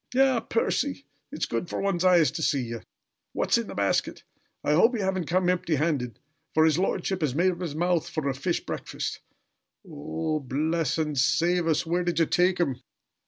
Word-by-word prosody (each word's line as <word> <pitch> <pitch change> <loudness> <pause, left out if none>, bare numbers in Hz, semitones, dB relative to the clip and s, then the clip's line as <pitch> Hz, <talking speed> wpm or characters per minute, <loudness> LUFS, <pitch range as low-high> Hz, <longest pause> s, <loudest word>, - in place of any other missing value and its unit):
"Ah, 265 -2 +4
Percy! 275 +5 -1 0.3
It's 300 - -2
good 120 +9 -3
for - - -3
one's 195 -3 0
eyes 175 -7 +5
to - - -5
see 140 -4 +1
ye! 115 -1 -5 0.6
What's - - +2
in - - -4
the - - -8
basket? - - 0 0.4
I - - +1
hope 225 +11 +4
ye 220 - -2
haven't 190 -4 -1
come 185 +1 +1
empty 175 -3 +1
handed, 135 -7 -1 0.4
for 160 0 +5
his 160 +1 +3
lordship 190 -1 -1
has 140 -4 0
made 180 +4 +3
up 175 0 -8
his 165 -5 -4
mouth 175 0 0
for 155 -4 -3
a 135 - +1
fish 170 +6 -2
breakfast - - -4 0.7
O - - -14
o - - -11
oh! 80 - -3
Bless 150 +4 -1
and 155 -2 -1
save 170 +6 +2
us! 160 0 +1
Where 175 +2 0
did 175 -2 -1
ye 165 - +4
take 180 +3 +2
'em?" 135 -7 0
170 Hz, 205 wpm, -26 LUFS, 150-180 Hz, 0.7 s, eyes